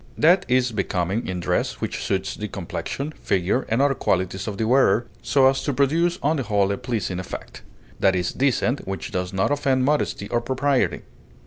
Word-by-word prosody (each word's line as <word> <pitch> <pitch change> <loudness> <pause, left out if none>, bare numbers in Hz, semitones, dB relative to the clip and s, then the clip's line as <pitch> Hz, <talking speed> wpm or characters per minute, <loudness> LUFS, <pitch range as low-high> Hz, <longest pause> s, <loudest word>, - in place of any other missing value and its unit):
That 175 +4 +4
is 125 0 +2
becoming 100 0 -1
in 90 -1 -3
dress - - 0
which - - -3
suits - - -1
the - - -4
complexion, 140 +3 -5
figure, 95 +8 0
and 115 +5 +2
other 140 -1 +3
qualities 95 -4 -1
of 100 -2 -4
the 110 - 0
wearer, 120 -2 +4 0.2
so 135 -2 +4
as 135 0 +2
to 145 - 0
produce 165 +6 +2
on 155 +3 +2
the - - 0
whole 100 -4 +1
a 100 - -1
pleasing 115 -7 -3
effect. 90 - -8 0.4
That 95 -1 +3
is 90 -1 -1
decent 130 -2 0
which 95 0 -4
does 90 0 -2
not 95 +6 0
offend 135 -3 +1
modesty 145 -8 0
or 120 - +1
propriety. 130 +2 0
120 Hz, 190 wpm, -23 LUFS, 95-140 Hz, 0.4 s, That